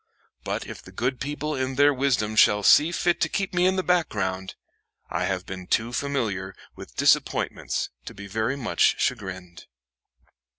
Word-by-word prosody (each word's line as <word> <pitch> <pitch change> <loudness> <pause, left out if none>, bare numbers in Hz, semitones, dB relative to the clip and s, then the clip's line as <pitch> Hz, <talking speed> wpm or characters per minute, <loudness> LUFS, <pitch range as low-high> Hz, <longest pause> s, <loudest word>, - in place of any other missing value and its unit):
But - - -3
if - - -9
the 95 - -14
good 125 +6 -2
people 150 +2 -3
in 130 0 -2
their 145 +1 +5
wisdom 125 -5 0
shall 105 -1 +5
see 155 - +6
fit 175 -1 0
to - - +2
keep 195 -2 -2
me 180 +1 +3
in 190 - +2
the 185 - 0
background, 95 - -1 0.6
I - - -1
have 95 -1 -2
been 95 -1 -8
too 115 +2 0
familiar 110 -10 -2 0.2
with - - -12
disappointments - - +1
to - - -8
be 100 - -9
very 110 +6 -1
much 130 -5 +1
chagrined." 95 -7 -4
120 Hz, 165 wpm, -25 LUFS, 95-145 Hz, 0.6 s, see